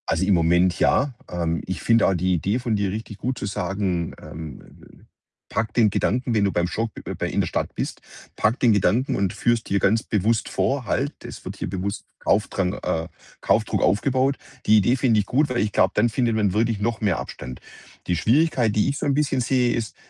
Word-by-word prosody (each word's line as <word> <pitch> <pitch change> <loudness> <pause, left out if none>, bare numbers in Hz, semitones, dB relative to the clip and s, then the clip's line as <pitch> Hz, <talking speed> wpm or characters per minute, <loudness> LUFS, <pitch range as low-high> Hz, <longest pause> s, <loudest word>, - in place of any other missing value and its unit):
Also, 95 - +1
im 100 - +3
Moment 85 +1 +3
ja. 140 0 +2 0.2
Ähm, 85 -1 -1
ich 95 - -4
finde 115 0 +4
auch 95 - +3
die 90 +1 +1
Idee 100 +7 0
von 120 -3 -1
dir 100 -2 0
richtig 110 0 -6
gut, 130 +2 -3
zu - - -4
sagen, 95 -3 -2
ähm, 80 0 -8 0.2
äh: - - -18 0.5
„Packe 110 -1 -2
den 115 -3 +4
Gedanken, 120 +5 0
wenn 105 -2 +2
du 100 - +2
beim 85 -1 0
Shop 115 +5 -2 0.3
bei - - -2
in - - 0
der - - -1
Stadt - - -2
bist, - - -4 0.3
packe 115 +4 +1
den 120 -3 +4
Gedanken 105 +6 +2
und 100 -2 0
führe 120 -1 +2
es 115 - -6
dir 100 - 0
ganz 110 +4 +2
bewusst 110 +2 0
vor: 135 -2 0
‚Halt, 140 +3 -1
das - - -10
wird - - -6
hier - - -4
bewusst 100 +2 -4
Kaufdrang 95 -2 0
äh, 80 0 -1 0.3
Kaufdruck - - +1
aufgebaut.'“ 130 +7 +2 0.3
Die 110 - +6
Idee 105 +5 +3
finde 120 -4 +2
ich 100 - 0
gut, 145 +7 +1
weil 125 -1 -1
ich 105 - 0
glaube, - - +3
dann 115 +3 +3
findet 115 0 0
man 105 -4 +1
wirklich 110 0 +1
noch 115 +1 -1
mehr 100 -5 +1
Abstand. 65 -1 -8 0.5
Die 90 - +1
Schwierigkeit, 125 - +2
die 105 +5 +2
ich 140 - -2
so - - -3
'n 140 - +2
bisschen 140 -2 +1
sehe, 125 0 +2
ist, 115 -2 -3
105 Hz, 220 wpm, -23 LUFS, 95-120 Hz, 0.5 s, Die